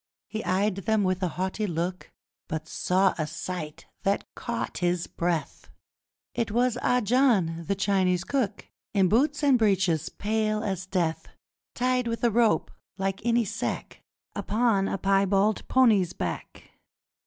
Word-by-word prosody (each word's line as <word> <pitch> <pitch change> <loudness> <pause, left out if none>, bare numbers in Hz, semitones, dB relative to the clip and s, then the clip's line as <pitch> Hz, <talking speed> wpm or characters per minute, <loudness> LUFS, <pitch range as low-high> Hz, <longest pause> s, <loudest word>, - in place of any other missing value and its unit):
He 220 0 -4
eyed 190 +2 +1
them 210 +2 +1
with 185 0 0
a 185 - +1
haughty 190 +4 -2
look, 175 +1 -3 0.4
But 155 0 -4
saw 190 +1 +2
a 155 - 0
sight 160 -1 -6 0.2
that 200 +1 -1
caught 235 -1 -4
his 175 -1 0
breath! 170 -2 -3 0.6
It 230 - -1
was! 240 +2 +2
Ah 250 0 +2
John! 205 -9 +2
The 200 - +1
Chinee 190 -2 +2
cook! 240 -8 -1 0.3
In 190 -2 +4
boots 290 - +2
and 270 -4 +5
breeches! 190 -7 +2
Pale 215 0 -1
as 190 -3 -3
death! 175 -4 -1 0.5
Tied 250 0 +1
with 230 +1 -3
a 235 - +4
rope, 225 -7 +2 0.3
like 195 0 -2
any 235 -1 +2
sack, 215 +3 -4 0.3
Upon 215 -3 +1
a - - -2
piebald 195 +2 +2
pony's 220 -9 +4
back! - - -6
195 Hz, 140 wpm, -27 LUFS, 185-230 Hz, 0.6 s, and